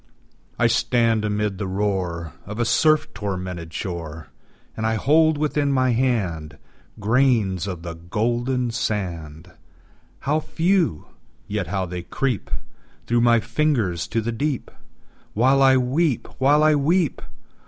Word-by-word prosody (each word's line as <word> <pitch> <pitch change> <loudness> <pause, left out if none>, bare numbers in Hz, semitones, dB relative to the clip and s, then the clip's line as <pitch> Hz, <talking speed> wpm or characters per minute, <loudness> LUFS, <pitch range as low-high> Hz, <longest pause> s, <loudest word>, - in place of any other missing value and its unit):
I - - +2
stand 115 -3 +2
amid 105 -2 -1
the 100 - -2
roar 95 -5 -2
Of 105 +2 -6
a 120 - +2
surf 155 +5 +3
tormented 90 -5 -5
shore, 80 -3 -6 0.5
And 110 - -4
I 110 0 +1
hold 155 +6 +3
within 150 -1 0
my 130 -2 +2
hand 95 - -1 0.4
Grains 110 -5 +2
of 90 -4 -5
the 85 -1 -5
golden 120 +8 -1
sand 90 -7 -4 0.7
How 150 +3 +1
few! 165 - 0 0.4
yet 100 -4 -2
how 95 +1 -1
they 90 0 -5
creep 125 +6 -2 0.6
Through 120 0 +2
my 120 -1 +5
fingers 115 - 0
to 115 - -1
the 115 +2 -2
deep 135 +3 -2 0.6
While 130 +5 +4
I 135 -1 +6
weep 130 +2 +1
while 145 +3 +4
I 155 0 +5
weep! 155 +2 +1
115 Hz, 130 wpm, -23 LUFS, 95-135 Hz, 0.7 s, I